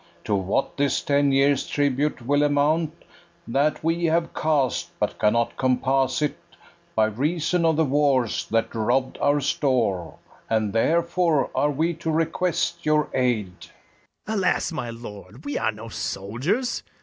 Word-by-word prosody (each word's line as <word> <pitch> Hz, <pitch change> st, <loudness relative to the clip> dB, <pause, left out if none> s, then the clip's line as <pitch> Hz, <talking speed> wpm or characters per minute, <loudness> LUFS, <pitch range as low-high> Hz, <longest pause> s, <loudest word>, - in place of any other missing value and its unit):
To 105 Hz, -, -2 dB
what 100 Hz, +6 st, -1 dB
this 140 Hz, -1 st, +1 dB
ten 140 Hz, 0 st, +2 dB
years' 135 Hz, 0 st, +3 dB
tribute 145 Hz, -2 st, 0 dB
will 145 Hz, +3 st, +2 dB
amount, 150 Hz, +3 st, +1 dB, 0.4 s
That 140 Hz, +6 st, 0 dB
we 165 Hz, +1 st, +1 dB
have 165 Hz, +1 st, +1 dB
cast, 145 Hz, -7 st, 0 dB
but -, -, -2 dB
cannot 115 Hz, +2 st, +1 dB
compass 130 Hz, +2 st, +1 dB
it 150 Hz, -, -2 dB, 0.6 s
By 110 Hz, -, +4 dB
reason 155 Hz, -, 0 dB
of 160 Hz, -1 st, +3 dB
the 160 Hz, +1 st, +2 dB
wars, 130 Hz, -11 st, +1 dB
that 115 Hz, +1 st, 0 dB
robb'd 125 Hz, +4 st, 0 dB
our 145 Hz, +1 st, +3 dB
store; 110 Hz, -, 0 dB, 0.3 s
And 110 Hz, -2 st, 0 dB
therefore 170 Hz, +4 st, +2 dB
are 145 Hz, -, +2 dB
we 160 Hz, +4 st, 0 dB
to 165 Hz, -1 st, -4 dB
request 170 Hz, +1 st, 0 dB
your 155 Hz, 0 st, +2 dB
aid. 120 Hz, -8 st, 0 dB, 0.7 s
BARABAS. 215 Hz, -1 st, -1 dB
Alas, 185 Hz, -, +1 dB
my 140 Hz, -7 st, -4 dB
lord, 115 Hz, +2 st, -10 dB
we 145 Hz, -, -2 dB
are -, -, +1 dB
no 110 Hz, +2 st, -10 dB
soldiers! 130 Hz, -, -2 dB
140 Hz, 145 wpm, -24 LUFS, 115-160 Hz, 0.7 s, By